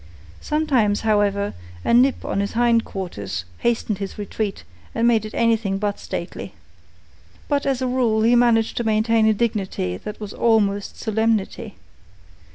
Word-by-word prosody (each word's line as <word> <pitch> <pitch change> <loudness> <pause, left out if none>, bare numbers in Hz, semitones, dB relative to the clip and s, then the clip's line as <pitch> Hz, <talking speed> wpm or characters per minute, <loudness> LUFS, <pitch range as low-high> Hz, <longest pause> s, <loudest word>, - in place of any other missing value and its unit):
Sometimes, 265 -10 +1
however, 205 -2 +1 0.3
a - - +2
nip 255 +3 +4
on - - -1
his 200 0 -2
hind 235 -1 +3
quarters 100 - -5
hastened 225 -4 0
his 195 -1 -5
retreat 205 0 -4 0.3
and 230 0 +2
made 225 -3 +3
it 215 - -8
anything 225 -4 +1
but 205 0 -2
stately. - - -6 0.9
But 285 -1 0
as 265 -2 0
a - - +1
rule 240 -4 +1
he 235 +2 +5
managed 235 -2 +3
to 235 - 0
maintain 220 0 +2
a 220 - +5
dignity 195 - -1
that 210 - -8
was 210 -2 -7
almost 205 -3 +1
solemnity. 220 -2 -1
220 Hz, 150 wpm, -22 LUFS, 200-235 Hz, 0.9 s, he